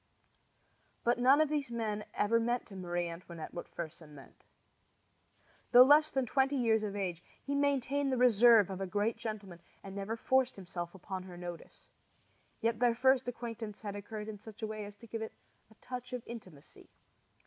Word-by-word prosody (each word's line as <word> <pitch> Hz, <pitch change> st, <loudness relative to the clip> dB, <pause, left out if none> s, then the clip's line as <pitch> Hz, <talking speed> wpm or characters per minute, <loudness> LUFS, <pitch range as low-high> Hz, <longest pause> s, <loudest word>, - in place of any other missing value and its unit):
But 240 Hz, +1 st, +2 dB
none 265 Hz, +4 st, +6 dB
of 310 Hz, -, +2 dB
these 295 Hz, -4 st, -1 dB
men 215 Hz, -3 st, -2 dB
ever 230 Hz, +3 st, +3 dB
meant 240 Hz, +1 st, 0 dB
to 200 Hz, -, -12 dB
Marie 175 Hz, -1 st, -2 dB
Antoinette 170 Hz, -1 st, -8 dB
what 175 Hz, -, -6 dB
Fersen 160 Hz, -2 st, -8 dB
meant. 135 Hz, -, -15 dB, 1.3 s
Though 245 Hz, +1 st, +11 dB
less 300 Hz, +3 st, +6 dB
than 265 Hz, -3 st, 0 dB
twenty 270 Hz, +3 st, +2 dB
years 225 Hz, -4 st, +3 dB
of 205 Hz, -2 st, -3 dB
age, 180 Hz, -4 st, -3 dB, 0.2 s
he 280 Hz, -, -4 dB
maintained 280 Hz, 0 st, +1 dB
the 260 Hz, -, +1 dB
reserve 235 Hz, -4 st, +6 dB
of 190 Hz, 0 st, -5 dB
a 195 Hz, -, -2 dB
great 205 Hz, +4 st, 0 dB
gentleman, 200 Hz, -6 st, -6 dB, 0.2 s
and 195 Hz, -1 st, -8 dB
never 200 Hz, +3 st, -3 dB
forced 260 Hz, +2 st, +2 dB
himself 175 Hz, -2 st, -6 dB
upon 190 Hz, 0 st, -6 dB
her 180 Hz, -1 st, -10 dB
notice. 175 Hz, -1 st, -9 dB, 0.8 s
Yet 230 Hz, -1 st, +1 dB
their 240 Hz, -1 st, +3 dB
first 260 Hz, +1 st, +3 dB
acquaintance 230 Hz, -3 st, -5 dB
had 205 Hz, -2 st, -5 dB
occurred 210 Hz, +1 st, -6 dB
in 215 Hz, -2 st, -7 dB
such 220 Hz, +1 st, -11 dB
a -, -, 0 dB
way 215 Hz, -1 st, -5 dB
as 205 Hz, 0 st, -10 dB
to 230 Hz, -, -14 dB
give 225 Hz, 0 st, -5 dB
to -, -, -1 dB
it -, -, -11 dB, 0.4 s
a 220 Hz, -, -20 dB
touch 250 Hz, +2 st, -7 dB
of 250 Hz, -2 st, -4 dB
intimacy. 185 Hz, -11 st, -11 dB
220 Hz, 185 wpm, -33 LUFS, 195-245 Hz, 1.3 s, Though